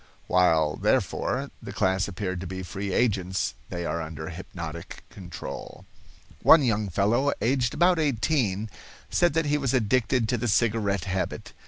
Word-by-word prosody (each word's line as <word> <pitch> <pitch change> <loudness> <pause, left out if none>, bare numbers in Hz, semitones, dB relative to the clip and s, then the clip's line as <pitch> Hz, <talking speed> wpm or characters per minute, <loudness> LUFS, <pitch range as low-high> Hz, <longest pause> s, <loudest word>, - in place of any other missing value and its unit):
While, 80 -4 +3
therefore, - - 0
the - - -7
class 95 0 +1
appeared 95 -2 -4
to 95 - -5
be 95 +1 -5
free 95 +3 -4
agents, 95 -5 0 0.2
they 85 -1 -4
are 85 - -2
under 80 0 -6
hypnotic 85 -2 -8
control. 90 -3 -8 0.6
One 160 -3 +7
young 110 -4 +1
fellow, 110 +10 +2
aged 120 0 +1
about 175 -1 +4
eighteen, 115 -7 0 0.4
said 175 -3 +3
that 165 -1 +2
he 150 0 +1
was 135 -2 0
addicted 120 0 +2
to 125 - +1
the 120 - -1
cigarette 105 -2 +1
habit. 95 -1 -3
100 Hz, 150 wpm, -26 LUFS, 90-125 Hz, 0.6 s, One